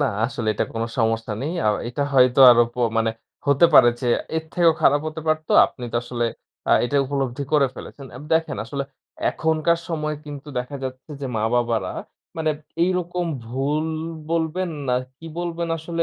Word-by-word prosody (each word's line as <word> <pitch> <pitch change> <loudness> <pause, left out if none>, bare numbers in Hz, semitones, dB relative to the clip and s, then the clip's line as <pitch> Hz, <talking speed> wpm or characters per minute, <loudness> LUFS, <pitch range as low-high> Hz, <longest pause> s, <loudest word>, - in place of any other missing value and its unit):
না - - +3 0.2
আসলে 115 -3 -3
এটা - - 0
কোনো 115 0 -1
সমস্যা 115 -1 0
নেই। 155 - -2
আ - - +5 0.2
এটা 125 +4 -2
হয়তো 130 0 +5
আরো 120 0 +6
প - - -28 0.2
মানে 115 0 +2 0.4
হতে 140 +4 +5
পারে 120 - +9
যে 125 - -2 0.3
এর 160 - -2
থেকেও 170 -2 +4
খারাপ 145 0 +5
হতে 155 +1 -7
পারত। 155 0 0 0.2
আপনি 125 - -9
তো - - 0
আসলে 120 0 -2 0.5
আ - - +6
এটা 145 +4 -1
উপলব্ধি 135 -1 -2
করে 145 -3 +5
ফেলেছেন। 135 +2 -10
এব 130 - -9
দেখেন 160 -2 0
আসলে 140 +5 -3 0.5
এখনকার 160 +1 +1
সময় 155 -2 -2
কিন্তু 145 0 -9
দেখা 125 +3 -4
যাচ্ছে 130 +3 -7
যে 135 - -3
মা-বাবারা 115 +1 0 0.4
মানে 160 -1 0 0.3
এইরকম 180 -1 -1 0.2
ভুল 140 +6 -1 0.4
বলবেন 170 +2 -1 0.2
না 125 - +3 0.2
কি 165 - -11
বলবেন, 170 -1 -3
আসলে 165 +1 -2
145 Hz, 170 wpm, -23 LUFS, 125-160 Hz, 0.5 s, পারে